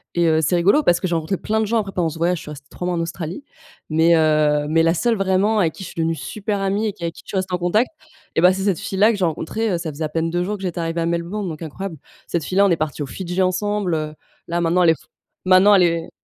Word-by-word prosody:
et 170 0 +2
heu, 160 0 +3
c'est 170 +4 +1
rigolo 195 - +4
parce 175 -5 +3
que 185 - -2
j'ai 170 - -2
rencontré 165 +4 -1
plein 220 +1 -1
de - - +1
gens 230 +1 +1
après 200 -3 -2
pendant 170 -3 0
ce 160 - -8
voyage, 175 +2 +1
je - - -10
suis - - -10
restée 145 -1 -11
3 180 - -5
mois 180 - 0
en 165 - -1
Australie. 170 - -5 0.5
Mais 165 +2 +4
heu 150 -2 +3
mais 165 +1 +3
la 165 0 +3
seule 235 +5 +1
vraiment 195 +2 +1
avec 165 -4 +1
qui 190 - -9
je - - -7
suis - - -13
devenue 165 0 +1
super 205 +3 -4
amie 200 +3 0
et 205 - -2
qui 175 - -12
avec 165 0 -2
qui - - -12
je - - -17
suis 195 - -2
restée 185 -1 -2
en - - -1
contact 210 +8 +2 0.5
et 160 - +3
bah, 180 +1 +7
c'est 190 0 -3
cette 195 -5 +1
fille 195 - -5
là 215 +3 +5
que - - -2
j'ai 185 - +1
rencontrée, 210 +7 -2
heu, 175 - +1
ça 165 -2 -4
faisait 150 +3 -5
à - - -4
peine 165 +1 -1
2 175 0 0
jours 210 +3 -2
que 195 - -11
j'étais 175 -2 -3
arrivée 165 0 -2
à - - 0
Melbourne, 170 +4 -2
donc 155 +1 -7
incroyable. 165 +2 -6 0.3
Cette 170 -3 -2
fille-là, 195 +2 +3
on 190 - +3
est 165 - +2
partie 150 -1 -3
aux - - -6
Fidji 185 +2 -3
ensemble, 190 0 0
heu, 155 0 -4 0.3
là 170 +1 -1
maintenant 170 +2 +2
elle 165 - +5
est 160 - -2
f - - -21 0.4
maintenant 190 +2 +6
elle 185 - +5
est 170 -1 0
175 Hz, 310 wpm, -21 LUFS, 165-195 Hz, 0.5 s, bah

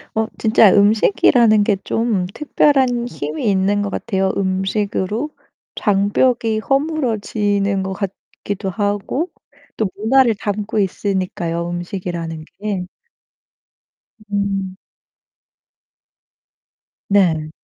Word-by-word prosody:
어 220 0 +1
진짜 215 -2 +5
음식이라는 215 +2 +4
게 205 0 +2
좀 225 -5 0
특별한 265 -5 +2
힘이 155 - -3
있는 195 +1 +1
것 205 - -2
같아요. 190 -2 -1
음식으로 200 +5 -1 0.5
장벽이 215 +3 +1
허물어지는 215 -8 0
것 190 0 -3
같기도 195 0 -5
하고 205 - -2 0.5
또 215 -3 0
문화를 235 +2 +3
담고 210 +1 -2
있으니까요, 185 -3 -2
음식이라는 175 -2 -5
게. 200 -3 -3 1.5
음. 195 -2 -1 2.3
네. 165 -6 +2
205 Hz, 195 characters per minute, -19 LUFS, 190-220 Hz, 2.3 s, 진짜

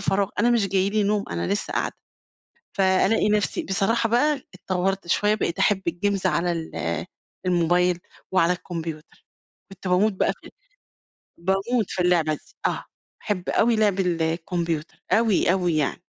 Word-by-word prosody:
فراغ 195 0 +1
أنا 240 - +4
مش 225 -5 +2
جاي 195 +1 +1
لي 215 0 +1
نوم، 205 0 +1
أنا 85 0 -2
لسّه 105 - -2
قاعدة. - - -1 0.8
فألاقي 195 +2 +3
نفسي 210 0 +1
بصراحة 225 +4 +1
بقى 275 +5 +2
اتطوّرت 190 +1 -2
شوية 210 +4 +2
بقيت 185 -4 -2
أحب 195 0 +2
الجيمز 195 +3 0
على 170 +3 +1
ال 85 - -3 0.4
الموبايل 175 0 +2 0.3
وعلى 180 -1 +4
الكمبيوتر. 165 -3 -7 0.5
كنت 195 0 -7
باموت 190 +4 +3
بقى 190 - +1
في - - -12 0.9
باموت 195 +5 0
في 180 - -1
اللعبة 165 -3 +2
دي، - - -15
آه. - - -2 0.4
أحب 190 -4 -3
أوي 230 +1 +3
لعب 205 -3 +2
الكمبيوتر 165 -1 -2
أوي، 220 -5 +3
أوي 180 -4 +1
يعني. 150 +1 -1
185 Hz, 145 wpm, -24 LUFS, 170-205 Hz, 0.9 s, أنا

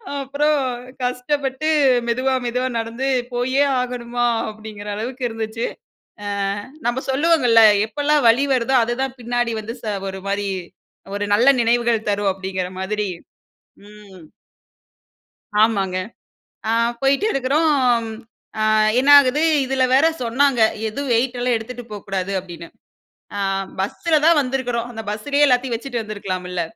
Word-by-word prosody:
அப்பறம் 285 +2 0 0.4
கஷ்டப்பட்டு 265 +3 -1 0.4
மெதுவா 260 +2 +1
மெதுவா 250 +2 -1
நடந்து, 230 +4 -3 0.3
"போயே 260 +3 +1 0.2
ஆகணுமா?" 245 -1 -2 0.2
அப்படீங்கிற 215 -1 -10
அளவுக்கு 250 +4 -5
இருந்துச்சு. 225 +1 -4 0.6
அ 200 0 -3 0.5
நம்ம 240 +2 0
சொல்லுவோங்கள்ள, 265 -5 +4 0.3
"எப்பெல்லாம் 290 0 +1
வலி 240 +5 +4
வருதோ, 255 +2 0
அது 240 - -2
தான் 265 -1 -3
பின்னாடி 240 -1 -1
வந்து 220 +2 -6
ச - - -8 0.2
ஒரு 190 - -7
மாரி 200 0 -1 0.7
ஒரு 205 - -2
நல்ல 240 +6 +4
நினைவுகள் 235 -1 +1
தரும்." 200 -1 +1
அப்படீங்கிற 190 -1 -4
மாதிரி. 210 +1 -2 0.8
ம். 205 -4 -15 1.4
ஆமாங்க. 195 -4 +2 0.7
அ - - +2 0.3
போய்ட்டு 275 +9 +2
இருக்கிறோம். 265 -3 +2 0.6
அ - - +1 0.4
என்ன 275 +3 +3
ஆகுது 280 +3 +2 0.2
இதில 260 0 0
வேற 280 +5 +5 0.2
சொன்னாங்க, 250 +1 +2 0.3
"எதுவும் 275 +4 -4
வெயிட்டலாம் 245 0 0
எடுத்துட்டு 245 +2 -7
போக்கூடாது" 195 -1 -4
அப்படீன்னு. 170 -2 -10 0.7
அ - - -3 0.4
பஸ்ஸல 310 - 0
தான் 330 -1 +5
வந்திருக்கிறோம், 245 -3 -2
அந்த 225 -1 -6
பஸ்ஸிலயே 280 +8 +1
எல்லாத்தையும் 250 -1 +1
வச்சுட்டு 240 -1 -4
வந்துருக்கலாமில்ல. 185 -4 -4
240 Hz, 120 wpm, -20 LUFS, 215-265 Hz, 1.4 s, வேற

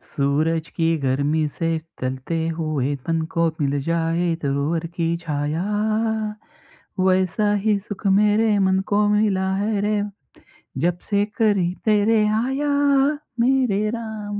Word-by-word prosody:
सूरज 155 +3 +1
की 165 -1 +1 0.2
गर्मी 145 +4 +1
से 165 - 0 0.3
चलते 130 +5 -3 0.2
हुए 145 -4 -1
तन 165 -1 +1
को 170 0 +3
मिल 140 0 0
जाए 165 +2 0 0.2
दूरवर 145 +4 -1
की 165 -2 +1 0.2
छाया, 150 +1 -2 1.4
वैसा 190 +3 +2
ही 210 -2 +3
सुख 205 +1 -9
मेरे 210 +1 +3
मन 190 0 +2
को 205 0 +3
मिला 200 -3 +1
है. 205 +1 0
रे 210 0 +1 0.8
जबसे 180 +4 0 0.2
करी 200 -5 +2
तेरे 215 +1 +3 0.2
आया. 270 +3 -1 0.7
मेरे 245 -4 +2
राम. 215 -2 -5
185 Hz, 115 wpm, -22 LUFS, 160-210 Hz, 1.4 s, को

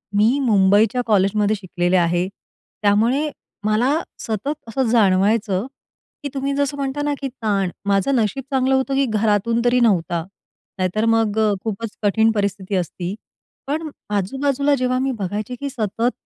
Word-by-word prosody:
मी 225 +7 +3
मुंबईच्या 210 -1 +3
कॉलेजमध्ये 210 0 +2
शिकलेले 180 -2 0
आहे. 175 +1 +1 0.5
त्यामुळे 230 +9 +2 0.4
मला 245 +9 +2 0.2
सतत 225 +7 -2
असं 250 +2 -1
जाणवायचं, 205 -1 +2 0.6
की 285 - -3
तुम्ही 275 0 -1
जसं 285 0 -1
म्हणता 275 +1 -2
ना, 290 - 0
की 275 - -1
ताण, 205 -7 -1
माझं 200 +7 +2
नशीब 240 +3 0
चांगलं 265 0 +2
होतं, 265 +1 0
की 275 0 +3
घरातून 220 +1 +1
तरी 245 +1 +4
नव्हता, 175 -7 +1 0.5
नाही 185 -1 +1
तर 215 +1 +1
मग 225 -2 +2 0.3
खूपच 225 +1 -3
कठीण 220 +2 +3
परिस्थिती 200 -2 -2
असती. 180 0 -3 0.5
पण 310 +2 -2 0.3
आजूबाजूला 275 +8 +1
जेव्हा 255 -1 0
मी 265 0 0
बघायचे, 205 +5 -3
की 280 0 -3
सतत 230 0 -1
220 Hz, 145 wpm, -21 LUFS, 200-265 Hz, 0.6 s, तरी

